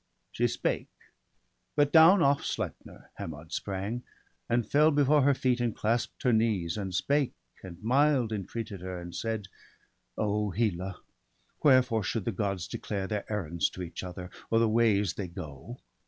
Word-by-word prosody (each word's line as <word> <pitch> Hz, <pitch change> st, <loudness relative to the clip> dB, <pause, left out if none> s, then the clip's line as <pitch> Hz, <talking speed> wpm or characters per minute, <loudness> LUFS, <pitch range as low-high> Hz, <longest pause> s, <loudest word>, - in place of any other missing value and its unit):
She -, -, +1 dB
spake: -, -, -2 dB, 0.9 s
but 145 Hz, -1 st, +3 dB
down 165 Hz, +3 st, +8 dB
off 140 Hz, 0 st, +3 dB
Sleipner -, -, -5 dB
Hermod 80 Hz, +1 st, -7 dB
sprang, 100 Hz, +5 st, -3 dB, 0.5 s
And 120 Hz, -2 st, +1 dB
fell 150 Hz, +5 st, +5 dB
before 145 Hz, 0 st, +4 dB
her 140 Hz, +1 st, +4 dB
feet, 130 Hz, -1 st, +1 dB
and 120 Hz, -2 st, 0 dB
clasp'd 115 Hz, +1 st, -1 dB
her 125 Hz, -, +3 dB
knees; 110 Hz, -7 st, +1 dB
And 100 Hz, -3 st, -4 dB
spake, 140 Hz, +9 st, +1 dB, 0.3 s
and 90 Hz, -2 st, -10 dB
mild 130 Hz, 0 st, +3 dB
entreated 105 Hz, -1 st, -5 dB
her, 90 Hz, -1 st, -5 dB
and 85 Hz, 0 st, -8 dB
said: 110 Hz, -2 st, -3 dB, 0.3 s
— -, -, -37 dB
' -, -, -47 dB
O 105 Hz, 0 st, 0 dB
Hela, 95 Hz, -2 st, -1 dB, 0.6 s
wherefore 130 Hz, -5 st, +5 dB
should 105 Hz, +1 st, -2 dB
the 115 Hz, -, 0 dB
Gods 95 Hz, -3 st, -2 dB
declare 100 Hz, -2 st, -4 dB
Their 105 Hz, +1 st, -4 dB
errands 85 Hz, -6 st, 0 dB
to 95 Hz, -, -7 dB
each 85 Hz, +1 st, -7 dB
other, 90 Hz, 0 st, -7 dB, 0.2 s
or 115 Hz, -, +3 dB
the 115 Hz, 0 st, +4 dB
ways 110 Hz, -4 st, +3 dB
They 100 Hz, -, -4 dB
go? 85 Hz, -, -8 dB
105 Hz, 165 wpm, -29 LUFS, 95-125 Hz, 0.9 s, down